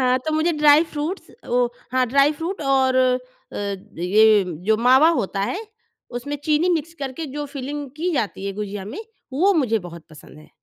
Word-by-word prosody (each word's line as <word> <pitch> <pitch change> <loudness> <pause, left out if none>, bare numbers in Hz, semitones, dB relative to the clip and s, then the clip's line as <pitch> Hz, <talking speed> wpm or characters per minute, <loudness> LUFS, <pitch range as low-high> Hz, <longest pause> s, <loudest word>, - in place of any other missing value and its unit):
हाँ, 255 0 +3
तो 310 - 0
मुझे 320 +2 +2
ड्राई-फ़्रूट्स 300 +3 +2
अ, - - -19
वो 245 0 +2 0.2
हाँ, 255 -1 +2
ड्राई-फ़्रूट 295 +8 +1
और 265 -1 +2
अ, 255 0 +3 0.8
ये 210 +3 +4 0.2
जो 220 +1 +3
मावा 260 +6 +5
होता 195 -1 -3
है 375 - -2 0.5
उसमें 270 +4 -4
चीनी 310 +3 +2
मिक्स 330 0 -1
करके 285 +1 -5
जो 295 - -2
फिलिंग 280 +1 -6
की 350 +3 -1
जाती 205 -7 -2
है 200 - -2
गुजिया 205 -1 -5
में, 220 - -7 0.3
वो 370 +9 +3
मुझे 240 -8 +2
बहुत 170 -1 -12
पसंद 150 0 -14
है। 155 - -16
265 Hz, 175 wpm, -22 LUFS, 220-305 Hz, 0.8 s, मावा